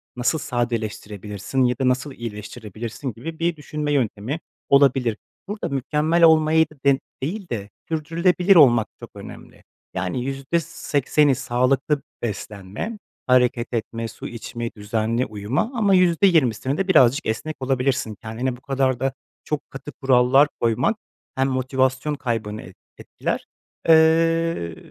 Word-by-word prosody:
nasıl 125 +6 0
sadeleştirebilirsin 110 -2 -3
ya 125 0 +1
da 130 - +1
nasıl 130 +3 0
iyileştirebilirsin 115 +2 -6
gibi 160 +9 -8
bir 170 0 +1
düşünme 150 0 -4
yöntemi 125 +2 -1 0.3
olabilir. 135 -5 +4 0.3
Burada 205 +1 -4
mükemmel 150 +5 +1
olmayı 160 0 +6 0.2
de 140 -1 +5 0.3
değil 185 +6 -4
de 105 -4 -4 0.2
sürdürülebilir 170 +4 +2
olmak 120 -9 +6
çok - - -10
önemli. - - -11 0.3
Yani, 95 +7 -2
%80'i 140 0 0
sağlıklı 130 +3 +1 0.2
beslenmek, 105 - -5 0.3
hareket 125 -1 +2
etmek, 115 0 -3
su - - -8
içmek, 120 0 -6
düzenli 110 +4 -1
uyumak 110 - -2
ama 205 -4 +3
%20'sini 165 - +3
de 195 +1 -1
birazcık 140 -4 +4
esnek 150 +8 -3
olabilirsin. 130 -3 0
Kendine 120 +3 -3
bu - - -21
kadar 135 -2 0
da 135 0 0 0.3
çok 150 -1 -4
katı 135 +2 -8
kurallar 135 +1 +4
koymak 120 - +1 0.4
hem 135 0 +1
motivasyon 130 +2 0
kaybını 110 -5 -3
et 90 +3 -13 0.2
etkiler. - - -4 0.4
Eee, 165 - +3
130 Hz, 125 wpm, -22 LUFS, 115-155 Hz, 0.4 s, olmayı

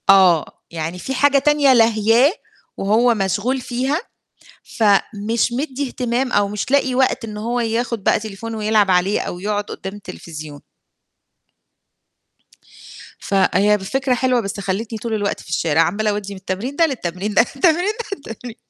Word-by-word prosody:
آه، 185 -5 +6 0.3
يعني 165 +2 -4
في 265 - -4
حاجة 280 +2 +3
تانية 290 -1 +4
لاهياه، 225 +3 +4 0.5
وهو 225 +5 +3
مشغول 210 +6 -1
فيها، 260 +6 -1 0.6
فمش 215 +2 +1
مدّي 275 +1 -3
اهتمام 250 +1 -2
أو 205 -3 +2
مش 210 +5 -4
لاقي 270 -2 +2
وقت 260 -1 +1
إن 210 -1 -7
هو 235 +3 -2
ياخد 230 -1 -2
بقى - - +3
تليفون 220 +2 -7
ويلعب 215 -2 +2
عليه 185 +3 +2
أو 175 - -5
يقعد 205 +2 -1
قدام 190 -1 -7
التليفزيون. 155 -7 -9 2.6
فهي 200 +1 +2
ب - - -13
فكرة 265 +5 0
حلوة 250 0 +1
بس 200 -1 -5
خليتني 210 +4 -3
طول 230 +1 -4
الوقت 205 -2 -1
في - - -15
الشارع، 160 -1 +1
عمّالة 210 +6 0
أودّي 205 -1 -3
من 195 - -9
التمرين 195 +9 -4
ده 330 - +4
للتمرين، 205 - -3
من - - -8
التمرين 330 - +2
ده 470 - -4
للتمرين 240 - -9
220 Hz, 150 wpm, -20 LUFS, 195-255 Hz, 2.6 s, آه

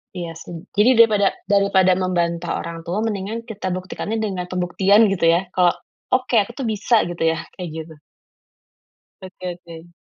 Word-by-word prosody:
Iya 170 -2 -5
sih. 175 - -9 0.2
Jadi 210 +4 +5
daripada 215 -3 +5 0.2
daripada 200 -2 +4
membantah 175 -2 -1
orang 170 0 -6
tua 200 +5 -1
mendingan 220 +1 -3
kita 220 -4 -6
buktikannya 190 +4 -4
dengan 185 -4 -3
pembuktian 190 +4 +3
gitu 180 -3 0
ya? 165 +1 +5
Kalau, 180 -2 +3 0.4
"Oke, 255 -2 +2
aku 205 +3 -1
tuh 270 - -4
bisa." 215 +2 +2
Gitu 175 -1 -4
ya, - - -6 0.2
kayak 180 -3 -6
gitu? 160 -1 -8 1.2
Oke 185 0 -11 0.3
oke. 165 0 -11
190 Hz, 155 wpm, -21 LUFS, 175-210 Hz, 1.2 s, Jadi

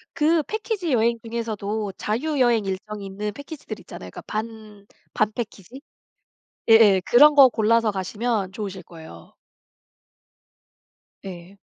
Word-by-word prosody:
그 315 +1 +2
패키지 420 -3 -3
여행 235 0 +2
중에서도 220 -3 -4
자유여행 240 -2 0
일정이 200 +2 -5
있는 205 +2 -5
패키지들 285 +3 -9
있잖아요. - - -11
그러니까 - - -9
반, 215 -2 -7 0.3
반 215 0 +1
패키지? 235 +3 -8 0.9
예예. 215 -4 +6
그런 295 +5 +6
거 275 -2 +9
골라서 230 -1 +2
가시면 205 +1 -2
좋으실 195 -3 -6
거예요. 160 - -14 1.9
예. 185 +1 -10
220 Hz, 275 characters per minute, -23 LUFS, 200-240 Hz, 1.9 s, 거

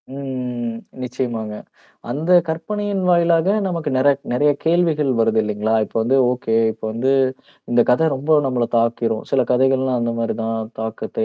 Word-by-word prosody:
ம். 125 -4 -5 0.2
நிச்சயமாங்க. 120 -4 -4 0.6
அந்த 155 +8 0 0.2
கற்பனையின் 200 +5 -3
வாயிலாக 170 -1 +3 0.2
நமக்கு 170 -5 -2
நெற 130 +2 +3 0.2
நெறைய 145 +4 +3
கேள்விகள் 160 -4 +2
வருது 115 0 +2
இல்லீங்களா? 105 +1 -1
இப்போ - - -10
வந்து 125 +4 +2 0.2
ஓகே, 120 -3 -1 0.2
இப்போ 110 - -13
வந்து 120 +4 0 0.6
இந்தக் 120 -1 +3
கதை 145 +6 +3
ரொம்போ 145 +4 +1
நம்மள 125 -2 0
தாக்கிரும். 115 -1 0
சில 135 - +3
கதைகள்லாம் 130 0 +2
அந்த 115 0 -1
மாரி 115 0 -1
தான் 115 0 -2 0.2
தாக்கத்த 110 0 -3
125 Hz, 145 wpm, -20 LUFS, 115-155 Hz, 0.6 s, வாயிலாக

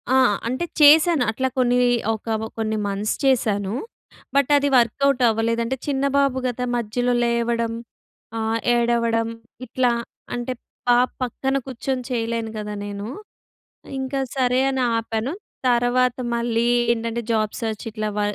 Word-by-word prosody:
ఆ! - - +6 0.3
అంటే 255 +8 -1 0.2
చేశాను. 305 -1 +7
అట్లా 260 +4 -1
కొన్ని 245 -1 +3 0.4
ఒక 220 +1 -3 0.2
కొన్ని 220 -1 -1
మంత్స్ 200 +2 -1
చేశాను. 210 -6 +1 0.6
బట్ 280 0 +3
అది 285 0 +1
వర్కౌట్ 255 +3 +2
అవ్వలేదంటే 230 +2 0
చిన్న 275 -1 0
బాబు 275 -2 +2
గదా! 250 0 -2
మధ్యలో 245 +2 0
లేవడం 235 -1 0 0.6
ఆహ్, 225 0 0 0.2
ఏడవడం 235 -1 +1 0.4
ఇట్లా 250 0 +1 0.4
అంటే 240 +1 -3 0.3
పా 245 - +6 0.3
పక్కన 265 +2 -1
కూర్చొని 260 0 -3
చేయలేను 230 -2 -2
గదా 210 0 -4
నేను. 205 0 -5 0.9
ఇంకా 265 +1 -2 0.2
సరే 255 0 +2
అని 265 -1 0
ఆపాను. 225 +3 -2 0.4
తర్వాత 245 +1 +2 0.2
మళ్లీ 235 0 0 0.3
ఏంటంటే 230 0 -2
జాబ్ 215 -1 +1
సెర్చ్ 220 -2 -3
ఇట్లా 215 -1 -3
వ - - +1
235 Hz, 130 wpm, -22 LUFS, 225-255 Hz, 0.9 s, చేశాను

